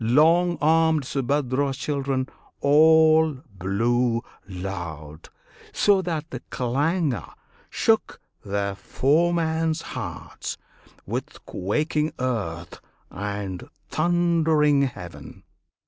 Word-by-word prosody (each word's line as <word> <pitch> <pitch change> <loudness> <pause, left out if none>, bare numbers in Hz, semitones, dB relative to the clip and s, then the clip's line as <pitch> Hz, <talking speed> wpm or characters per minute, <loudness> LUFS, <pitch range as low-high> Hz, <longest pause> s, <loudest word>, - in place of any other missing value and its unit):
Long 165 +8 +4
armed 160 0 +3
Subhadra's 135 0 0
children, 140 -3 -1 0.3
all 160 +1 +5 0.2
blew 115 +5 0 0.3
loud, 85 -5 -7 0.4
So 200 -2 +4
that 165 -3 -4
the 125 - -5
clangour 140 +4 -1 0.3
shook - - +1 0.2
their 100 0 -2
foemen's 160 - +1
hearts, 95 - -6 0.5
With - - -5
quaking 150 - -1
earth 100 -10 -3 0.3
and 100 -2 -5 0.2
thundering 160 -3 +2
heav'n. 90 -9 -10
140 Hz, 80 wpm, -24 LUFS, 105-160 Hz, 0.5 s, all